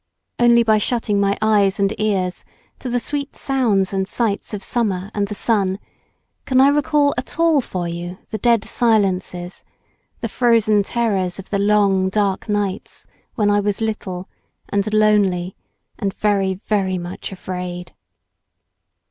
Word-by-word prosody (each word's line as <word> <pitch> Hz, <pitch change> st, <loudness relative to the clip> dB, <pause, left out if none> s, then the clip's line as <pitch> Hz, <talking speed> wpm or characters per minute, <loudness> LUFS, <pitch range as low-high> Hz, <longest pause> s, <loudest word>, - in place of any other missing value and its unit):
Only 235 Hz, -1 st, +5 dB
by 220 Hz, -1 st, +3 dB
shutting 215 Hz, -2 st, 0 dB
my 200 Hz, 0 st, +1 dB
eyes 205 Hz, -3 st, +3 dB
and 200 Hz, +1 st, +2 dB
ears 190 Hz, -4 st, -1 dB, 0.4 s
to 255 Hz, -, -5 dB
the 245 Hz, 0 st, 0 dB
sweet 280 Hz, +3 st, -4 dB
sounds 220 Hz, -9 st, +1 dB
and 190 Hz, -1 st, -1 dB
sights 215 Hz, -1 st, -2 dB
of 205 Hz, -2 st, -5 dB
summer 200 Hz, -5 st, -1 dB
and 205 Hz, -1 st, -1 dB
the 210 Hz, -, -5 dB
sun 195 Hz, -3 st, +1 dB, 0.7 s
can 260 Hz, -1 st, +2 dB
I 270 Hz, +1 st, +7 dB
recall 290 Hz, 0 st, +2 dB
at 255 Hz, -, -8 dB
all 330 Hz, -3 st, +4 dB
for 180 Hz, -7 st, -4 dB
you 175 Hz, +1 st, -6 dB
the 215 Hz, -, -4 dB
dead 230 Hz, -1 st, +2 dB
silences, 190 Hz, -5 st, 0 dB, 0.6 s
the -, -, -2 dB
frozen 225 Hz, -4 st, +3 dB
terrors 200 Hz, -5 st, -1 dB
of 195 Hz, -, -10 dB
the 200 Hz, -, 0 dB
long, 200 Hz, -2 st, +3 dB
dark 200 Hz, +1 st, -1 dB
nights 205 Hz, -2 st, -3 dB, 0.3 s
when 205 Hz, -1 st, +2 dB
I 205 Hz, -, +3 dB
was 205 Hz, -1 st, -1 dB
little, 195 Hz, -5 st, -3 dB, 0.4 s
and 200 Hz, +1 st, 0 dB
lonely, 205 Hz, -4 st, +2 dB, 0.4 s
and 195 Hz, -, -1 dB
very 195 Hz, -2 st, 0 dB
very 190 Hz, -3 st, 0 dB
much 175 Hz, +2 st, -6 dB
afraid. 180 Hz, -1 st, -6 dB
205 Hz, 150 wpm, -20 LUFS, 190-225 Hz, 0.7 s, I